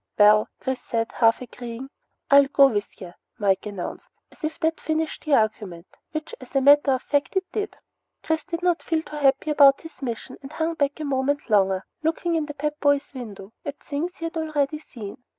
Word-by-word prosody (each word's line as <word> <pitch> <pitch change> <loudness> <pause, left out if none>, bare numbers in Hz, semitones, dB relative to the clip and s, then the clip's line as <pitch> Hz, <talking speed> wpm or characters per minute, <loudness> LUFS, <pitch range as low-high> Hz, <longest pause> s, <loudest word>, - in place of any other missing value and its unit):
"Well 210 0 +6
" - - -56
Chris 260 -1 -3
said, 230 -1 -2
half 225 +1 +3
agreeing. 245 +2 -8 0.4
"I'll 280 0 +8
go 280 0 +6
with 210 -6 -1
ya!" 180 -2 -8 0.3
Mike 200 0 +1
announced, 200 -4 -6 0.2
as - - -22
if 310 +1 -3
that 320 0 +1
finished 315 0 -2
the 300 -2 +4
argument; 205 -6 -1 0.3
which, 310 0 -5
as 255 - -13
a 270 - +4
matter 285 0 +6
of 260 - -2
fact, 285 +4 0
it 380 0 +1
did. 420 0 -3 0.5
Chris 320 -1 0
did 345 0 -5
not 355 -1 +2
feel 320 -2 -1
too 300 - -8
happy 280 +1 +2
about 280 -2 +6
his 325 -2 -13
mission 250 0 -5
and 275 +2 -10
hung 325 +1 -1
back 285 -1 -1
a - - -3
moment 280 -1 -1
longer, 195 -2 +3 0.2
looking 330 +2 0
in 315 -2 0
the 295 - -7
Pep 300 +1 -3
Boys' 285 0 +1
window 215 -5 -9
at 285 -1 -5
things 325 +5 -4
he 330 - -6
had 330 0 -4
already 305 -2 -1
seen. 220 -9 -9
280 Hz, 205 wpm, -24 LUFS, 230-310 Hz, 0.5 s, I'll